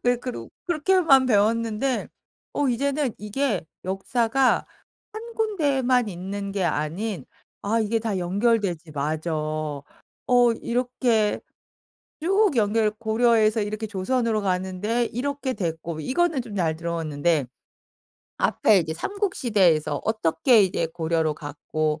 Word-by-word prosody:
그래 245 0 +3
그룩 250 +1 -7 0.2
그렇게만 325 -5 +4
배웠는데 230 +3 +1 0.4
어 285 - 0
이제는 275 +1 0
이게 210 -1 -1 0.2
역사가 230 +7 +1 0.5
1 460 +2 -8
군데만 275 - +1
있는 195 +2 -5
게 195 -1 -1
아닌 170 - -2 0.4
아 225 +3 +1
이게 225 +1 +1
다 220 -3 -2
연결되지 185 -3 0
맞아. 155 +3 -2
어 155 - -1
이렇게 240 -3 +1 0.8
쭉 390 +3 +3
연결 215 0 +2
고려에서 220 0 +2
이렇게 215 +1 -3
조선으로 220 +2 0
가는데 190 +5 -1
이렇게 270 +3 -3
됐고 165 -5 -4
이거는 315 - +1
좀 230 -4 -9
잘 165 -5 0
들어왔는데 160 -3 -1 0.9
앞에 210 -2 +3
이제 160 -2 -2
삼국 400 - -2
시대에서 190 - +2
어떻게 220 - +3
이제 180 -3 0
고려로 160 -1 -1
갔고 150 +1 -3
215 Hz, 260 characters per minute, -24 LUFS, 170-250 Hz, 0.9 s, 그렇게만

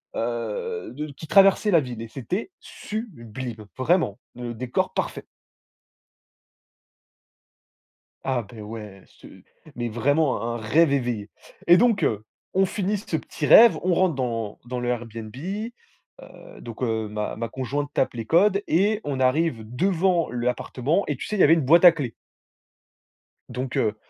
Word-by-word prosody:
heu, 440 - -3
de 150 +2 -6
qui 155 +3 -11
traversait 195 +3 +5
la 170 -4 +5
ville 125 -4 -7
et 115 - -6
c'était 180 - -4
sublime 125 - -7
vraiment. 135 - +1 0.2
Le 120 -1 -5
décor 120 +2 -2
parfait. - - -3 3.0
Ah 130 -2 0
beh 110 +1 -12
ouais 105 -2 -9
ce - - -17 0.5
mais 120 -1 -3
vraiment 140 +3 +1
un 115 +1 -2
un - - -3
rêve 140 +7 +3
éveillé! 120 -6 -2 0.4
Et 175 - +8
donc 225 +3 +3
heu, 110 -1 0 0.3
on 190 +1 +3
finit 200 +2 -1
ce 180 -4 -3
petit 155 - -5
rêve, 230 +8 +8
on 180 0 +2
rentre 180 -2 +2
dans 115 -5 -3
dans 125 0 -4
le 120 - -3
Airbnb, 115 -2 -4
heu, 220 - -9
donc 115 +1 -9
heu, 110 -3 -1
ma 105 0 -3
ma 115 +1 -4
conjointe 140 +4 -3
tape - - +1
les 115 -2 -4
codes 200 - +3
et 205 +6 +2
on 140 -2 -3
arrive 130 -1 +1
devant 175 - +1
l'appartement 125 +7 -1
et 145 - -2
tu - - -6
sais 215 - -3
il - - -3
y - - +8
avait 155 - +7
une 165 - +3
boîte 165 +6 +6
à 175 - +11
clés 140 -8 -5 1.4
donc 130 0 -4
heu, 110 -1 +1
130 Hz, 155 wpm, -24 LUFS, 115-180 Hz, 3.0 s, à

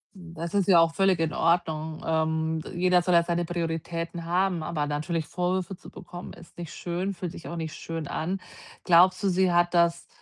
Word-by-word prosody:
Hm, 170 -3 -11
das 170 +2 -5
ist 200 -3 +2
ja 180 -4 +7
auch 165 0 +4
völlig 195 -3 +3
in 160 -2 0
Ordnung. 160 -2 0
Ähm, 160 0 0
d - - -9
jeder 180 0 +4
soll 180 +1 +1
ja 170 0 +6
seine 170 0 -1
Prioritäten 165 0 -3
haben, 180 0 +1
aber 155 -1 -2
natürlich 155 +2 -2
Vorwürfe 185 +1 -1
zu - - -13
bekommen, 175 0 -9
ist 170 - -16
nicht 170 -3 -7
schön, 180 +3 -3
fühlt 175 -2 -5
sich - - -10
auch 170 - -5
nicht 160 -2 -4
schön 165 -2 -5
an. 185 +7 -3 0.4
Glaubst 180 +2 +5
du, 200 - +3
sie 185 0 +2
hat 175 0 +3
das 170 -1 +2
170 Hz, 205 wpm, -27 LUFS, 165-180 Hz, 0.4 s, ja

